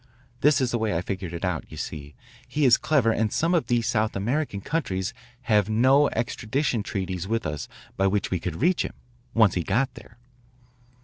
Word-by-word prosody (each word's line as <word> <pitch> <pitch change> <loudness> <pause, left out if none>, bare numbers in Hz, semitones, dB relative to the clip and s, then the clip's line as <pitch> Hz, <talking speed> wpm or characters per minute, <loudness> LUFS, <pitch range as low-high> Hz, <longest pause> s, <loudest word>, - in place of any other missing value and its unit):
This 150 +1 +4
is 130 -3 0
the 120 - 0
way 110 -6 0
I - - -1
figured 95 -2 -4
it 85 +2 -4
out. 90 -4 -1
You - - -10
see, 75 -2 -6 0.3
he 150 -1 +1
is 120 -2 +7
clever 135 -7 +2
and 110 -1 0
some 165 +2 +1
of 170 - +1
these 120 -1 +1
South 110 -1 0
American 115 +3 -1
countries 100 - -2 0.3
have 105 -5 +2
no 130 +6 +4
extradition 115 +2 -1
treaties 95 -3 -3
with 115 +2 -1
us 75 -2 -4 0.3
by 95 - +3
which 100 0 0
we 90 - 0
could 85 -1 -4
reach 175 +7 +2
him, - - -5 0.4
once 110 -5 +5
he 90 - 0
got 125 +9 0
there." 110 - -14
110 Hz, 195 wpm, -25 LUFS, 95-130 Hz, 0.4 s, is